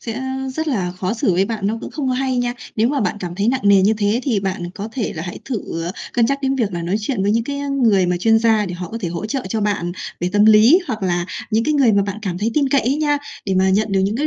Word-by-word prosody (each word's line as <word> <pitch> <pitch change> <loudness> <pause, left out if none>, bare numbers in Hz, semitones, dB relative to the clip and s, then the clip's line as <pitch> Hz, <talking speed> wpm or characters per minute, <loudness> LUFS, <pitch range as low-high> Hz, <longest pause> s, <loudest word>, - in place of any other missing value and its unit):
sẽ, 230 - -5
ơ, 260 - -5 0.3
rất 315 +2 -2
là 195 -10 -1
khó 185 +3 -3
xử 225 -5 +1
với 185 +3 +2
bạn, 215 -2 -3
nó 220 +3 -1
cũng - - -7
không 285 -4 -3
có 255 - +1
hay 260 0 -1
nha. 245 0 0 0.2
Nếu 225 +2 +3
mà 280 0 0
bạn 195 -1 -1
cảm 175 -2 -5
thấy 200 +4 0
nặng 260 +1 +1
nề 200 -1 +6
như 210 - +4
thế 210 +4 +1
thì 230 -8 0
bạn 185 -2 -3
có 210 +1 -5
thể 240 -4 -2
là 160 - -5
hãy 175 - -6
thử, 205 -9 -4
ờ, 175 - -3 0.2
cân 235 -2 +3
nhắc 275 +3 0
đến 270 0 +1
việc 225 -7 -1
là 170 -1 -3
nói 180 +5 0
chuyện 215 -2 -2
với 200 - +2
những 230 0 +1
cái, 280 +1 -4
ơ, 285 - -4
người 195 -5 +4
mà 180 - +1
chuyên 225 +5 +3
gia 220 -2 +2
để 180 - -5
họ 180 -1 -6
có 230 - -4
thể 180 - -2
hỗ 170 +5 -4
trợ 260 +4 -2
cho 220 +2 -1
bạn 200 -4 -1 0.3
về 175 - 0
tâm 205 0 +4
lý, 220 +9 +7
hoặc 220 -5 -4
là 175 -2 0 0.2
những 225 +1 +2
cái 305 0 +1
người 265 -6 +4
mà 200 -1 +3
bạn 200 +1 -4
cảm 180 -4 -3
thấy 215 +4 0
tin 285 -3 +2
cậy 275 0 +3
ấy 265 +5 0
nha, 295 -1 +1 0.3
để 190 - 0
mà 190 0 +3
nhận 210 +1 +1
được 195 - +3
những 200 +3 0
cái 295 +4 0
215 Hz, 320 wpm, -19 LUFS, 190-250 Hz, 0.3 s, lý